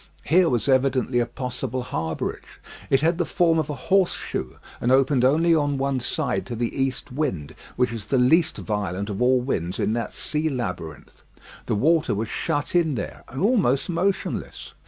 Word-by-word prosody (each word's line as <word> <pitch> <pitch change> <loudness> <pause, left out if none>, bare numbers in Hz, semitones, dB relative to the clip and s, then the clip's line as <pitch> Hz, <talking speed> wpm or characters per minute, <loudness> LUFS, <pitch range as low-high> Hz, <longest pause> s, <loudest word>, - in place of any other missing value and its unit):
Here 175 +2 +4
was 120 +1 0
evidently 130 -2 +2
a 120 - +1
possible 125 0 -4
harbourage. 80 -9 -4 0.3
It 135 0 +3
had 165 +2 +2
the - - +3
form 165 -1 +2
of 155 - -2
a 150 - -3
horse 185 +7 +2
shoe, 65 - -5 0.2
and 120 - +1
opened 135 -1 +3
only 160 +6 +4
on 145 -3 +1
one 135 -1 0
side 125 +1 -2
to 120 - -4
the 115 0 -2
east 135 -2 -2
wind, 125 - -2 0.2
which 125 -1 +1
is 110 -3 -6
the 135 - +1
least 155 +7 +3
violent 100 -1 -3
of 100 - -4
all 125 0 +4
winds 90 -9 -2
in 110 - 0
that 115 -2 -3
sea 155 +1 -1
labyrinth. 90 - -5 0.5
The - - +1
water 155 +4 +2
was 110 +2 -3
shut 145 -3 -2
in 165 -5 +2
there, 100 - -6
and 130 - -6
almost 190 - +2
motionless. 185 +3 -2
130 Hz, 180 wpm, -24 LUFS, 120-155 Hz, 0.5 s, Here